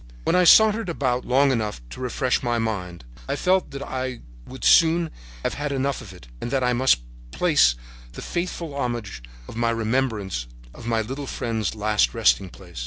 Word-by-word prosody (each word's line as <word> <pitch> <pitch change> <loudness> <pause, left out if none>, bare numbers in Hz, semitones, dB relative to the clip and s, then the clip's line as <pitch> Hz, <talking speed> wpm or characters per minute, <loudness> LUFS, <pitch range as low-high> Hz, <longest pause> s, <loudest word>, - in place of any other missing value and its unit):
"When - - +1
I - - +5
had 180 - +4
sauntered 220 0 +6
about 130 -6 -1
long 135 +2 +3
enough 110 - -2
to - - -9
refresh 125 0 0
my 120 -2 0
mind 90 - -3 0.2
I 140 - -1
felt 185 +5 +1
that 140 0 -6
I 130 -2 -4 0.3
would 130 - -10
soon 165 -1 +5 0.3
have - - -1
had 145 0 -3
enough 140 0 -1
of 105 -6 -11
it 90 -10 -14
and - - -3
that 130 0 0
I 125 0 +2
must 125 - +3 0.3
place - - +3 0.4
the - - -8
faithful 175 -3 -4
homage 120 - -3 0.3
of - - -10
my 115 0 +1
remembrance 110 - -1 0.3
on 120 - -7
my 115 -1 +1
little 135 +5 -5
friend's 110 -4 -2
last 105 +1 +1
resting 105 -4 +3
place. 60 - -12
125 Hz, 185 wpm, -24 LUFS, 110-140 Hz, 0.4 s, sauntered